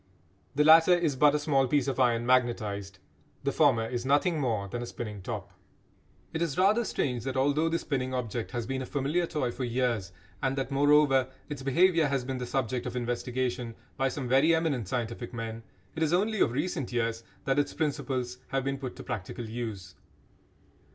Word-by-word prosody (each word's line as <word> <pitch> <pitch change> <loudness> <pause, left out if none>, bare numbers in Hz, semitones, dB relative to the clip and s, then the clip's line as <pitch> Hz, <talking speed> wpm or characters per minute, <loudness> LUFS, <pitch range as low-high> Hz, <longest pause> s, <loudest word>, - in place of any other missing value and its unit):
The 150 - +4
latter 165 +3 +7
is 160 -5 0
but 145 +2 +5
a - - +4
small 140 -3 +2
piece 140 +1 +1
of 135 -2 -2
iron 120 -2 +3
magnetised; 110 -6 0 0.5
the 140 - +1
former 130 -8 +3
is 120 0 -3
nothing 145 +5 +2
more 115 -7 -1
than 120 +5 -5
a 120 - -5
spinning 105 -5 -6
top. - - -5 0.8
It 160 - -2
is 165 -2 -1
rather 205 +6 +4
strange 125 - -1
that 130 0 -3
although 145 +4 +2
the 165 - +1
spinning 130 -5 -2
object 120 -3 -3
has 120 -2 -3
been 130 +2 -3
a 130 - -5
familiar 150 +5 0
toy 130 -7 -1
for 130 - -5
years, 120 -6 -1 0.3
and 135 0 0
that, 135 0 -2
moreover, 140 -2 +4 0.2
its 145 -3 -5
behaviour 165 +4 +3
has 135 -2 -1
been 130 -1 -3
the 125 - -4
subject 125 -1 -1
of 125 - -5
investigation 120 -1 -2 0.2
by 135 0 +1
some 130 -1 -4
very 135 +6 +4
eminent 145 - -1
scientific 120 +1 -4
men, 115 0 -5 0.3
it 160 - -4
is 160 0 +2
only 210 +4 +1
of - - +3
recent 145 0 -2
years 115 -1 -1 0.2
that 135 +1 +2
its 145 - 0
principles 135 -5 -2
have 135 -1 -1
been 135 0 -2
put 130 -2 -6
to - - -9
practical 115 +2 -5
use. 110 -5 -5
130 Hz, 190 wpm, -29 LUFS, 120-145 Hz, 0.8 s, latter